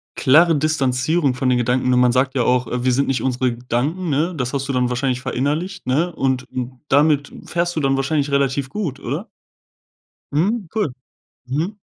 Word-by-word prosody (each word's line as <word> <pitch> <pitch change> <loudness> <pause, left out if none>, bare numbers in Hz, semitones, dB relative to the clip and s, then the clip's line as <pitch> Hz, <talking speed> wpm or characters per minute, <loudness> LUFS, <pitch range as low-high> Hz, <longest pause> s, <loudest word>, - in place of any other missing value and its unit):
klare 165 +6 +5
Distanzierung 145 0 +1
von 125 +1 -2
den 125 - +3
Gedanken. 125 +1 +1
Nur 125 - +3
man 125 -1 +4
sagt 130 +2 +1
ja 125 - +2
auch, 125 0 +2
äh: 125 +1 -3
„Wir 130 - +3
sind 140 +3 +1
nicht 130 -4 0
unsere 125 -1 0
Gedanken,“ 135 +9 -2
ne? 155 +5 +1
Das 125 -3 -3
hast 135 -1 -2
du 140 - -2
dann 125 -1 +1
wahrscheinlich 125 0 -1
verinnerlicht, 145 +9 -2
ne? 160 +7 +1
Und 130 -3 -1
un 125 0 -5
damit 145 0 +3
fährst 175 0 -1
du - - 0
dann 135 -2 +2
wahrscheinlich 140 +1 0
relativ 140 -1 +1
gut, 155 -7 -4
oder? - - -4 1.0
Mhm, 195 +7 0
cool. 210 - -1 0.5
Mhm. 160 +11 -2
135 Hz, 185 wpm, -20 LUFS, 125-155 Hz, 1.0 s, klare